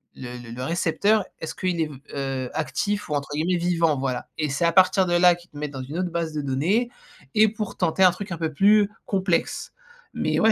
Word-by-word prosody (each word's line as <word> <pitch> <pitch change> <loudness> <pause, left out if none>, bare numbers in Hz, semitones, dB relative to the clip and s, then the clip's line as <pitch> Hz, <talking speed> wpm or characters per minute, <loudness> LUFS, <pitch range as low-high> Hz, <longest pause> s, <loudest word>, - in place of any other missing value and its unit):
le 125 -1 -7
le 120 -1 -11
-le 125 +2 -5
récepteur, 175 +7 +2 0.2
est-ce 160 - -6
qu'il 180 -2 -1
est - - +2
v 150 - -10 0.2
heu, 135 -2 -3
actif 160 +8 -2
ou - - -1
entre 140 0 -3
guillemets 170 +4 +1
«vivant», 170 -4 +1
voilà. 130 -2 -2
Et 155 -2 -1
c'est 140 +5 0
à 170 - +4
partir 185 +1 +5
de 175 - -1
là 175 0 +6
qu'ils 175 0 -18
te 145 - -12
mettent 150 -1 -4
dans 135 -1 -6
une 145 +6 -6
autre 180 -1 -1
base 165 -2 -2
de 150 - -2
données 160 - +1 0.4
et 215 +1 +6
pour 210 -1 -5
tenter 180 +1 +2
un 185 - +8
truc 195 +1 -8
un - - -4
peu 160 -1 -2
plus 205 +6 +4 0.2
complexe. 190 -3 -1 0.4
Mais, - - 0
ouais, 225 - +6
170 Hz, 235 wpm, -24 LUFS, 145-185 Hz, 0.4 s, un